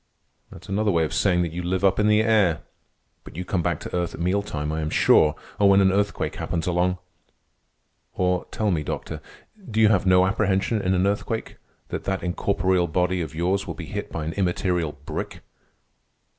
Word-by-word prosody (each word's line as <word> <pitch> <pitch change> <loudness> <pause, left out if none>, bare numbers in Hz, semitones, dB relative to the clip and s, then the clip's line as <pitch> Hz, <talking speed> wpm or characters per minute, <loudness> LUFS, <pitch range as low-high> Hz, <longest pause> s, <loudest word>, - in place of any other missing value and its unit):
"That's 90 - -13
another 105 +2 0
way 85 -4 +2
of 80 - -3
saying 90 -3 +2
that 85 - -3
you 85 +2 -4
live 90 +2 -2
up 95 +1 +3
in 105 - +3
the 105 0 +4
air. 105 -7 +2 0.6
But - - -13
you 90 +2 -5
come 90 0 -1
back - - -1
to - - -6
earth 90 -2 -2
at - - -12
meal 90 +4 +1
time, 75 -6 -4
I 80 0 -2
am 75 - -2
sure, 75 0 +4 0.2
or 100 -1 +5
when 100 0 +6
an 95 -1 +4
earthquake 100 +1 -1
happens 80 -2 -3
along. 90 +1 +1 1.2
Or, 90 -1 0
tell 105 -2 -1
me, 80 -4 0
Doctor, - - -5 0.5
do 110 0 -1
you 110 -1 +6
have 100 -3 +2
no 90 0 +5
apprehension 100 +2 0
in 95 -1 +1
an 90 +1 +2
earthquake 105 +3 -2 0.3
that - - -5
that 95 -1 -2
incorporeal 90 0 +1
body 90 +2 0
of 80 -2 -6
yours 90 +4 0
will - - -5
be - - -7
hit - - -5
by 80 - -4
an 80 - -3
immaterial 90 -4 0
brick?" - - -5
90 Hz, 200 wpm, -24 LUFS, 85-100 Hz, 1.2 s, when